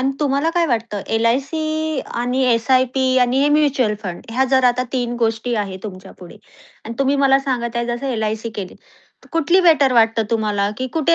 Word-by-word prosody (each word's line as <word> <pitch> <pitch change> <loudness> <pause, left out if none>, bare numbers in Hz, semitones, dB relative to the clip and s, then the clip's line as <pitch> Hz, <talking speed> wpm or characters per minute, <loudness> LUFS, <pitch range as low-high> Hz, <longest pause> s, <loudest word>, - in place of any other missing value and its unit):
अन 265 +1 +1
तुम्हाला 285 +2 +1
काय 345 -1 +3
वाटतं 225 -6 -2
एल-आय-सी 310 +6 -1 0.2
आणि 250 +2 -1
एस-आय-पी 255 +3 +1 0.2
आणि 250 +2 0
हे 290 - +3
म्युच्युअल 275 -7 +1
फंड 180 -4 -6
ह्या 255 +4 +1
जर 260 -1 +3
आता 250 +1 -2
3 245 -2 -2
गोष्टी 225 +1 -1
आहेत 190 -1 -8
तुमच्यापुढे, 185 -3 -10 0.5
अन् 230 - -6
तुम्ही 275 +1 +2
मला 275 -1 +4
सांगत 245 -4 -3
आहे 235 0 -1
जसं 240 +3 -3
एल-आय-सी 220 0 -3
केली. 195 -3 -6 0.5
तर - - -20
कुठली 330 +3 +3
बेटर 285 -5 +4
वाटतं 225 -1 +3
तुम्हाला, 210 -3 0
की 260 - -2
कुठे 320 +2 +3
245 Hz, 180 wpm, -19 LUFS, 225-275 Hz, 0.5 s, मला